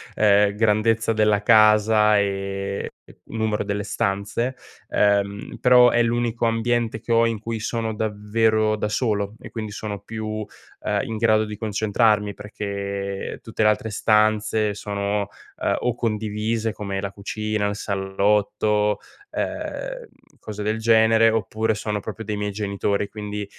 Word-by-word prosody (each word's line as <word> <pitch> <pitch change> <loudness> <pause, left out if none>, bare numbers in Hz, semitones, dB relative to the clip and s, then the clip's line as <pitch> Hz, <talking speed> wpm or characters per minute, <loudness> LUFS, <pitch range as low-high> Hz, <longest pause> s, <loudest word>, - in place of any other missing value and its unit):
ehm, 105 -1 +4
grandezza 110 +1 +2
della 105 -1 +2
casa, 110 -1 +5
ehm, 100 0 -2 0.2
e - - -18
numero 110 -2 -2
delle 100 0 -2
stanze; 100 +6 -2 0.3
ehm, 100 0 +1
però 125 -1 +7
è 120 - +3
l'unico 120 0 0
ambiente 115 0 0
che 115 - -6
ho 115 0 +5
in 115 -1 -1
cui 115 +1 -4
sono 110 0 -2
davvero 110 +1 +1
da 105 - -1
solo 105 -2 -1
e - - -10
quindi 110 -2 -5
sono 105 -1 -5
più, 110 +1 -5 0.4
ehm, - - 0
in 110 - -4
grado 110 -1 +3
di 105 -1 -7
concentrarmi, 105 -1 +1
perché, 100 -1 -5
ehm, - - -10
tutte 115 - -5
le 105 - +5
altre 105 +1 0
stanze 110 0 +2
sono, 100 0 -2 0.3
ehm, - - +1
o 125 - 0
condivise 110 0 -1
come 100 -2 -4
la 100 -1 -4
cucina, 105 +1 -2
il 105 - -2
salotto, 105 +1 0 0.3
ehm, - - -4 0.3
cose 105 -1 -6
del 110 +2 -1
genere, 110 0 +5
oppure 110 0 0
sono 105 0 -3
proprio 110 +2 -7
dei 105 -1 -3
miei 105 0 -2
genitori. 100 0 -1
Quindi 105 -1 -5
105 Hz, 145 wpm, -23 LUFS, 105-110 Hz, 0.4 s, però